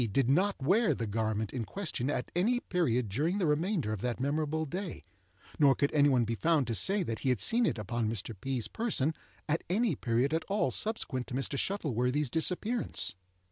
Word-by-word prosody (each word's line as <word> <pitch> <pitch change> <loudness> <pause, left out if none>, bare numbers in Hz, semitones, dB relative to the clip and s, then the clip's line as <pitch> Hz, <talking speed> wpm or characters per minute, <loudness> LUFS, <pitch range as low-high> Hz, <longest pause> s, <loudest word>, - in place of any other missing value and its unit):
did 135 +3 +2
not 185 +9 +2
wear 195 - +3
the 115 - -3
garment 110 0 -1
in 125 -3 -2
question 145 - -3
at 125 - -2
any 230 +8 +2
period 125 - 0
during 150 - 0
the 195 - +1
remainder 155 - 0
of 105 - -5
that 125 -1 -2
memorable 155 +3 0
day, 180 +4 -5 0.6
nor 140 -3 +6
could 140 - 0
any 145 -1 +5
one 125 -3 +3
be 115 - -2
found 155 +3 +2
to 115 - -2
say 195 - +2
that 115 -8 -3
he 135 - 0
had 125 -4 +2
seen 230 - +3
it 115 - -1
upon 110 +1 -2
Mr. 115 0 -3
P.'s 130 -5 -2
person 160 - 0 0.3
at 160 +2 0
any 205 -1 +2
period 125 +4 0
at 160 0 0
all 205 +2 0
subsequent 170 - -2
to 125 - -5
Mr. 135 +1 -2
Shuttleworthy's 140 - -1
disappearance. 190 - 0
145 Hz, 195 wpm, -31 LUFS, 120-180 Hz, 0.6 s, nor